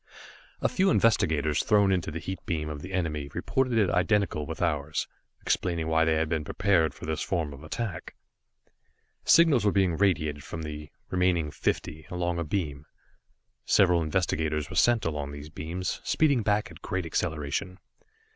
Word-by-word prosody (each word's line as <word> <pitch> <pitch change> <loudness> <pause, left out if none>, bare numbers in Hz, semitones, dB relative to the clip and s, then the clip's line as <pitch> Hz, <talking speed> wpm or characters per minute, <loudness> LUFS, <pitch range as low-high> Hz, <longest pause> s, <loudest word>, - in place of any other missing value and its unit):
A - - +3
few 195 -5 +2
investigators 80 - +2
thrown 100 -3 +3
into 90 -4 0
the 80 - -5
heat 95 +4 -6
beam 75 -3 -2
of 75 -1 -6
the 90 - -8
enemy 75 -6 -2
reported 130 -3 0
it 105 -5 +3
identical 90 -5 +1
with 80 - -6
ours, 75 -2 -1 0.4
explaining 85 -3 0
why 80 0 +3
they 80 -1 +2
had 80 0 +1
been 80 -1 -1
prepared 90 -1 +1
for - - -9
this 80 0 -2
form 80 -6 -2
of 70 +2 -12
attack. 95 +3 -5 1.1
Signals 160 -8 +6
were 105 - +3
being 95 -4 +2
radiated 75 -7 +1
from 80 +4 -6
the 75 -1 -7 0.2
remaining 90 -4 +1
fifty, 75 +1 -3
along 85 -1 -2
a - - -1
beam. 75 -4 -3 0.8
Several 90 -3 +4
investigators 80 -2 -1
were - - -6
sent 120 -3 +3
along 75 -3 -3
these 75 +1 -8
beams, 85 +4 -4
speeding 140 -6 +2
back 105 +1 0
at - - -14
great 95 -1 -3
acceleration. 80 +3 -2
85 Hz, 165 wpm, -28 LUFS, 75-95 Hz, 1.1 s, Signals